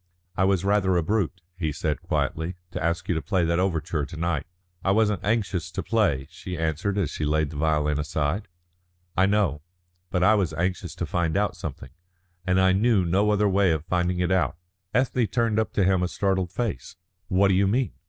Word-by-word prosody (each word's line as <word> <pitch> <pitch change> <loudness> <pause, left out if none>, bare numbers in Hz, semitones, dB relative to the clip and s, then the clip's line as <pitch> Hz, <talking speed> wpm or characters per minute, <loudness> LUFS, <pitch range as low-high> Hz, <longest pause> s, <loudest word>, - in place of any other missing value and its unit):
"I 95 - +2
was 95 -1 +1
rather 100 -3 +3
a 85 - +1
brute," 95 -1 -1 0.2
he 80 -4 0
said 75 +1 -2
quietly, 80 +3 -2 0.2
"to - - -4
ask 85 +1 -1
you - - +1
to 80 - -1
play 85 +5 +1
that 85 +1 +1
overture 85 -4 0
to 75 - -7
night." 80 -3 -1 0.4
"I - - +1
wasn't 105 0 +2
anxious 100 -6 0
to - - -4
play," 85 -13 +1
she 90 +1 -7
answered 80 +5 -1
as 95 -8 0
she - - -4
laid 75 0 +1
the 75 - -7
violin 75 -1 +1
aside. 75 +6 -1 0.7
"I 95 +1 +4
know. 100 -8 +1 0.5
But 90 -1 0
I 105 - +6
was 95 -7 0
anxious 90 0 -2
to 85 - -3
find 85 0 0
out 105 0 0
something, 65 - -7 0.6
and 90 0 +3
I 95 0 +5
knew 100 0 +3
no 95 +5 +2
other 105 0 +3
way 100 -1 +3
of 80 -2 0
finding 90 +1 0
it 90 +1 0
out." 95 -2 +1 0.3
Ethne 125 -2 +1
turned 115 -2 +1
up 110 - -1
to 100 - +2
him 95 0 +3
a 90 - +1
startled 95 -2 -1
face. 95 - -3 0.3
"What 95 +1 +3
do - - +3
you 95 +1 +3
mean?" 120 0 +1
90 Hz, 205 wpm, -25 LUFS, 80-100 Hz, 0.7 s, I